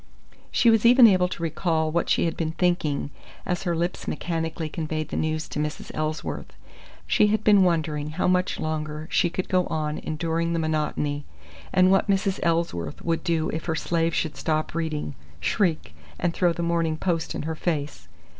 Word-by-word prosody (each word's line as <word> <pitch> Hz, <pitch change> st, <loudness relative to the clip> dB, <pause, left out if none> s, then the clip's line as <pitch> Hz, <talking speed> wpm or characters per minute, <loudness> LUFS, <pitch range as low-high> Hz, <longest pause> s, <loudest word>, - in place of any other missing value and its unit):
She 235 Hz, -, +4 dB
was 225 Hz, -2 st, +3 dB
even 245 Hz, +1 st, +8 dB
able 185 Hz, -4 st, +5 dB
to 175 Hz, -2 st, -6 dB
recall 160 Hz, -1 st, 0 dB
what 170 Hz, +1 st, 0 dB
she -, -, +3 dB
had 165 Hz, -, -1 dB
been 160 Hz, -1 st, -2 dB
thinking, 160 Hz, -6 st, 0 dB, 0.3 s
as 180 Hz, -1 st, -1 dB
her 175 Hz, -3 st, -1 dB
lips 170 Hz, +2 st, -2 dB
mechanically 165 Hz, 0 st, -2 dB
conveyed 155 Hz, 0 st, -3 dB
the -, -, -4 dB
news 155 Hz, 0 st, -1 dB
to -, -, -4 dB
Mrs. 150 Hz, 0 st, -4 dB
Ellsworth. 155 Hz, +1 st, -3 dB, 0.5 s
She 210 Hz, -, +4 dB
had 215 Hz, 0 st, +1 dB
been 205 Hz, -2 st, +6 dB
wondering 155 Hz, -4 st, 0 dB
how 160 Hz, +4 st, -1 dB
much 180 Hz, 0 st, +1 dB
longer 155 Hz, 0 st, -3 dB
she 175 Hz, -, +3 dB
could 185 Hz, +2 st, -3 dB
go 185 Hz, -1 st, +2 dB
on 150 Hz, -1 st, -2 dB
enduring 165 Hz, +1 st, -1 dB
the -, -, 0 dB
monotony, 150 Hz, -2 st, -1 dB, 0.5 s
and 185 Hz, 0 st, +5 dB
what 195 Hz, +2 st, +3 dB
Mrs. 195 Hz, -1 st, +1 dB
Ellsworth 165 Hz, -, -1 dB
would 165 Hz, -1 st, 0 dB
do 160 Hz, -2 st, 0 dB
if 160 Hz, -, -4 dB
her 160 Hz, -, -1 dB
slave 165 Hz, 0 st, 0 dB
should 160 Hz, -, -1 dB
stop 155 Hz, -1 st, -1 dB
reading, 155 Hz, -, -2 dB, 0.3 s
shriek, 160 Hz, -, 0 dB, 0.2 s
and 175 Hz, -, 0 dB
throw 175 Hz, -1 st, +2 dB
the 170 Hz, 0 st, -3 dB
Morning 165 Hz, -2 st, 0 dB
Post 165 Hz, -1 st, -1 dB
in -, -, -3 dB
her 160 Hz, +1 st, -2 dB
face. 150 Hz, -, -3 dB
165 Hz, 185 wpm, -25 LUFS, 155-175 Hz, 0.5 s, even